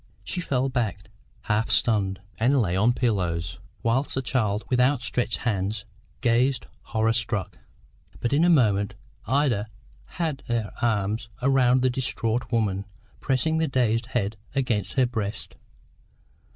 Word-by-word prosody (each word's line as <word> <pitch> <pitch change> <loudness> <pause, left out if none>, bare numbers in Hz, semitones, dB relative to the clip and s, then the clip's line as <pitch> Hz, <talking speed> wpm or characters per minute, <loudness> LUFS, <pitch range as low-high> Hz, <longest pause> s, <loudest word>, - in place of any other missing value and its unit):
She 180 - -2
fell 135 -5 0
back, 110 -6 -2 0.3
half 110 0 0
stunned, 100 -4 +2 0.2
and 130 +5 +4
lay 95 -6 +1
on 105 +5 +4
the 120 - 0
pillows, 90 -7 0 0.2
whilst 125 +5 +1
the 130 - -1
child, 110 -5 0
with 125 - +1
outstretched 125 -2 +1
hands, 105 -1 -2 0.4
gazed 125 +3 +2 0.2
horror 110 0 +1
struck. 115 -4 -2 0.6
But 120 - -1
in 150 +4 +4
a 175 - +5
moment 105 - +3 0.3
Ida 130 -6 +2 0.4
had 160 -5 -3
her 115 -3 -1
arms 110 0 0
around 130 -2 +4
the 130 - +3
distraught 125 -2 -1
woman, 100 -4 0 0.3
pressing 160 +4 +1
the 160 - +2
dazed 115 -3 +1
head 110 -4 -1 0.2
against 125 -7 0
her 130 -2 +4
breast. 110 -4 -3
120 Hz, 140 wpm, -25 LUFS, 105-130 Hz, 0.6 s, a